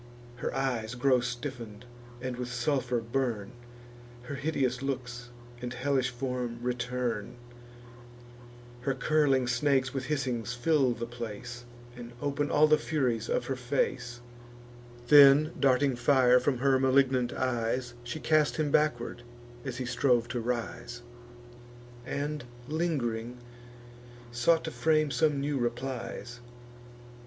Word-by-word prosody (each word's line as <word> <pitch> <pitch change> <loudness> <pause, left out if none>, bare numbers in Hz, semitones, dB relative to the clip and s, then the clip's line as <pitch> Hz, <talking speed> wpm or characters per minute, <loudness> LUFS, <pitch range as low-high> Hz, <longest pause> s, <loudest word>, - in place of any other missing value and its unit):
Her - - -3
eyes 120 -4 -1
grow 130 0 +3
stiffen'd, 120 -3 -6 0.4
and 130 -1 -3
with 125 0 -5
sulphur 125 -1 0
burn; 115 -3 -2 0.7
Her 125 - -7
hideous 135 -3 -1
looks 125 -3 -4 0.3
and 125 0 -4
hellish 130 0 +1
form 125 -1 -3
return; 125 -2 -2 1.4
Her 135 +2 -1
curling 135 -2 +2
snakes 130 +2 +1
with 135 -2 -3
hissings 125 -4 -2
fill 135 0 +2
the 115 0 -5
place, 120 +1 -7 0.3
And 120 -1 -9
open 145 +1 -1
all 150 +1 +5
the 155 0 +4
furies 125 -8 -1
of - - 0
her 135 - -2
face: 120 -1 -2 0.9
Then, 145 +1 +8
darting 135 0 +3
fire 125 0 +4
from 130 +1 0
her 135 +1 +3
malignant 130 -2 +3
eyes, 120 0 -1
She 120 +6 -5
cast 155 -1 +2
him 150 -2 0
backward 120 -6 +1 0.4
as 130 -3 -5
he 130 - -3
strove 120 -2 +2
to 120 +1 -2
rise, 120 0 -4 1.0
And, 145 0 -3 0.2
ling'ring, 125 -8 -2 0.9
sought 120 +8 +2
to 160 - -4
frame 155 -2 +2
some 145 +2 +2
new 140 0 -1
replies. 120 0 -4
125 Hz, 120 wpm, -29 LUFS, 120-140 Hz, 1.4 s, Then